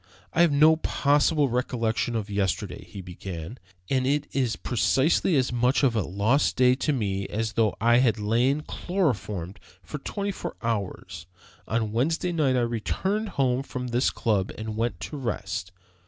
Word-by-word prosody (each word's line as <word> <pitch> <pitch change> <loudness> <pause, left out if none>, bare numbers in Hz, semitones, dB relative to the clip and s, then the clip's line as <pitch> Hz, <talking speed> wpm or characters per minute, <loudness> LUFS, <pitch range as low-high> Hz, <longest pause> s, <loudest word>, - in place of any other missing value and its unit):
"I 170 - +3
have 170 -3 +5
no 155 +3 +5
possible 145 0 +2
recollection 120 -2 -1
of 110 -3 -2
yesterday," 100 -3 -2
he 100 - -9
began, 90 +3 -7 0.3
"and 130 -1 +1
it 145 +1 +1
is 125 -5 0
precisely 135 - +2
as 130 -3 +1
much 125 +4 +2
of 125 -4 +3
a 110 - +2
lost 100 - +1
day 125 -1 +5
to 135 +4 0
me 100 -7 -1
as 110 0 -2
though 110 -3 +2
I 120 +2 +4
had 120 -4 +3
lain 120 +7 +1
chloroformed 105 - -2 0.2
for 120 - -6
twenty 200 +7 -3
four - - -6
hours. 95 -6 -3 0.4
On 110 -1 -1
Wednesday 160 - 0
night 150 -6 +2
I 125 - +2
returned 190 - -1
home 130 -2 +2
from 125 -2 -5
this 120 +2 +2
club 105 -4 0
and 110 -1 -5
went 115 -5 -1
to 150 - -5
rest. 95 -7 -3
120 Hz, 165 wpm, -26 LUFS, 105-140 Hz, 0.4 s, have